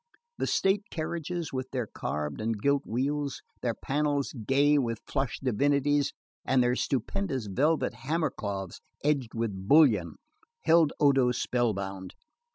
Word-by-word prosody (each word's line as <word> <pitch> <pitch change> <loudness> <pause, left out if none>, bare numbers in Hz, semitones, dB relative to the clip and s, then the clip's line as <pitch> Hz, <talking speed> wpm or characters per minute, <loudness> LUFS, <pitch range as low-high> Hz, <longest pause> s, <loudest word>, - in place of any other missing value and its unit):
The - - 0
state 195 +1 +2
carriages, 170 0 -4
with 130 0 -3
their 125 -3 -2
carved 75 -6 -4
and 110 -1 -1
gilt 140 +4 +1
wheels, 140 +4 -2 0.2
their 120 -2 -1
panels 145 0 -1
gay 140 +5 +3
with 115 -4 -1
flushed 135 -2 -2
divinities 140 +3 +2 0.3
and 130 -1 +3
their 125 0 +2
stupendous 135 - -1
velvet 145 +11 +1
hammer 155 +1 -1
cloths 100 -5 -5 0.2
edged 140 -6 0
with 100 -5 -3
bullion, 125 - +5 0.5
held 165 -3 +5
Odo 135 -4 +4
spellbound. 100 -7 -2
135 Hz, 130 wpm, -28 LUFS, 115-145 Hz, 0.5 s, bullion